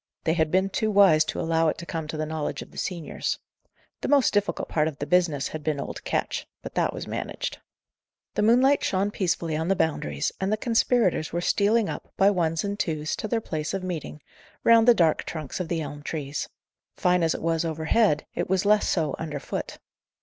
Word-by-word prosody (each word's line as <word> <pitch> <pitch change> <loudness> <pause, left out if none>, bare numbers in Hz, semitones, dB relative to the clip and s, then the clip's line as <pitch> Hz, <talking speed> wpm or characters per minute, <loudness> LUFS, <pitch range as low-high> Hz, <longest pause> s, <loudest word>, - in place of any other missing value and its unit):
They 160 - +2
had 160 -2 +1
been 190 +3 +1
too 220 - 0
wise 195 -7 +6
to - - -4
allow 165 0 +2
it 155 - 0
to 170 - -7
come 160 -2 -4
to 155 - -5
the 155 - -1
knowledge 155 -1 -3
of - - -18
the - - -15
seniors. 175 -5 -3 0.6
The - - -2
most 280 -4 +4
difficult 205 0 0
part 155 -1 +1
of 155 -3 -5
the 145 - -3
business 165 -6 +2
had 155 -1 -6
been 150 -2 -1
old - - -6
Ketch; - - -2 0.2
but - - -7
that - - +1
was - - -6
managed. - - -4 0.7
The - - 0
moonlight 250 +6 +4
shone 195 +2 +1
peacefully 170 -5 -1
on 160 +2 -1
the 195 - +3
Boundaries, 145 - -1
and 190 +1 0
the 215 - +2
conspirators 230 -7 +2
were 170 - -1
stealing 205 +4 +2
up, - - -6
by 195 +1 +5
ones 165 -4 0
and 200 0 -3
twos, 155 -2 -1
to - - -3
their 225 +1 0
place 155 -2 -3
of 190 - -4
meeting, 165 -4 -5 0.4
round 230 0 +6
the 240 - +8
dark 165 -5 +3
trunks 155 -1 -5
of 180 - -2
the 165 -1 -1
elm 145 -1 -6
trees. 145 -2 -4 0.5
Fine 180 0 +3
as 165 -1 +2
it - - -6
was 165 0 +1
overhead, 160 +2 +1
it - - -3
was 190 +1 +1
less 210 0 +4
so 155 -5 0
under 155 -3 -4
foot. - - -5
170 Hz, 215 wpm, -26 LUFS, 155-200 Hz, 0.7 s, the